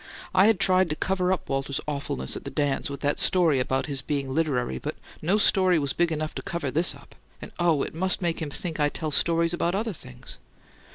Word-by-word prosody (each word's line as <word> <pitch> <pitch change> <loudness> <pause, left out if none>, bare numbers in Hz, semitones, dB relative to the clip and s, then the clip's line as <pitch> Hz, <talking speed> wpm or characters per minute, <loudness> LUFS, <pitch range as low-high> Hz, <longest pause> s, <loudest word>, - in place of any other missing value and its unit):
"I'd 195 +2 +5
tried 185 -2 +4
to 150 - -1
cover 185 +1 0
up 190 - -1
Walter's 135 0 -1
awfulness 140 - -2
at - - -7
the - - -5
dance 145 -1 -1
with 140 - -6
that 145 0 0
story 165 -7 +3
about 130 +1 0
his 140 -3 -1
being 140 -3 -2
'literary,' 130 - 0
but - - -4 0.3
no 180 +7 +2
story 185 -4 +4
was 140 -3 -1
big 175 -1 +1
enough 155 0 -2
to - - -5
cover 170 -7 -3
this 165 +5 +2
up - - -16 0.3
and - - -9
oh! 165 -5 +3
it - - -5
must 185 +3 0
make 170 -2 -1
him 155 - -3
think 160 +2 -6
I 145 0 +3
tell 155 +1 -3
stories 165 +2 +2
about 175 +1 0
other 220 +1 -1
things!" 125 -4 -10
160 Hz, 220 wpm, -26 LUFS, 140-180 Hz, 0.3 s, I'd